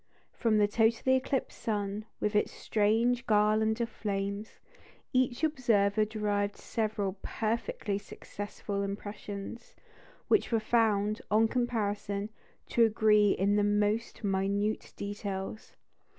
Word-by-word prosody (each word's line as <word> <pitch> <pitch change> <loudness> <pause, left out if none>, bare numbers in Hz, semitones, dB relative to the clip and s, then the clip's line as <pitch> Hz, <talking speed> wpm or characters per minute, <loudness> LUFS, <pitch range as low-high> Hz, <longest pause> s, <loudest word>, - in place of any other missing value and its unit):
From 225 -3 +2
the 205 -1 +4
totally 225 +4 +3
eclipsed 260 0 -3
sun, 210 -1 -2
with 210 0 -1
its 210 - +2
strange 230 +4 +1
garland 215 +1 +3
of 235 - +1
flames, 200 0 -4 0.6
each 255 +1 +1
observer 220 -8 +2
derived 205 -1 -1
several 210 -3 -2
perfectly 225 - -2
successful 205 0 -6
impressions, 205 +2 -6 0.5
which 425 - +2
were 225 - +3
found, 215 -2 +2
on 220 +2 +4
comparison, 210 -4 -1 0.4
to 235 - +4
agree 215 -2 +4
in 200 +2 +2
the 205 - +3
most 210 +3 0
minute 200 +2 0
details. 200 0 -5
210 Hz, 110 wpm, -30 LUFS, 205-225 Hz, 0.6 s, the